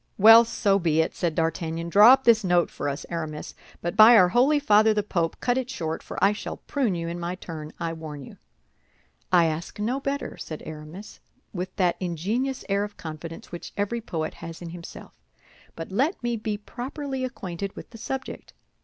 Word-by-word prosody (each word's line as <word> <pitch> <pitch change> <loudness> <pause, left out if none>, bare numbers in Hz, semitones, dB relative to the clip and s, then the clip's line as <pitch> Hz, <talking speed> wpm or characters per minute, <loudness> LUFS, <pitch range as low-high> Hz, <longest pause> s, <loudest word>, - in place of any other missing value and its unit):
"Well, 225 +3 +9
so 200 -3 +1
be 160 -3 +1
it," 160 - +1
said 170 -3 -1
D'Artagnan. 165 0 -2
"Draw 210 +7 +8
up 265 - +2
this 230 -3 +5
note 175 -2 +2
for - - -3
us, 140 +1 -5
Aramis; 155 -3 -5 0.3
but 175 - -2
by 225 +2 +9
our 180 -3 +6
Holy 255 +9 +4
Father 215 -6 +4
the 210 - +1
Pope, 170 -5 -2
cut 245 +1 +1
it 255 -1 -5
short, 160 -8 -4
for - - -9
I 200 +1 +5
shall 210 - -6
prune 255 -10 -1
you 165 -1 -3
in 170 +1 -4
my 175 +1 -3
turn, 155 -4 -8
I 165 -1 -2
warn 155 -3 -8
you." - - -13 0.9
"I 175 -2 +5
ask 160 +5 -4
no 240 +6 -1
better," 275 +1 -4
said 155 - -7
Aramis, 155 +6 -9 0.3
with 185 0 -5
that 180 -3 +1
ingenious 205 - -2
air 200 0 +1
of 205 0 -7
confidence 160 +1 -8
which 175 - -8
every 205 +4 -1
poet 160 -7 -4
has 165 -1 -9
in 175 - -7
himself; 170 -1 -10 0.6
"but 165 +3 -7
let 270 - 0
me 240 -1 0
be 215 -1 -3
properly 265 +5 -5
acquainted 195 -6 -5
with - - -10
the 225 - -11
subject. 260 +3 -6
190 Hz, 195 wpm, -25 LUFS, 165-230 Hz, 0.9 s, Well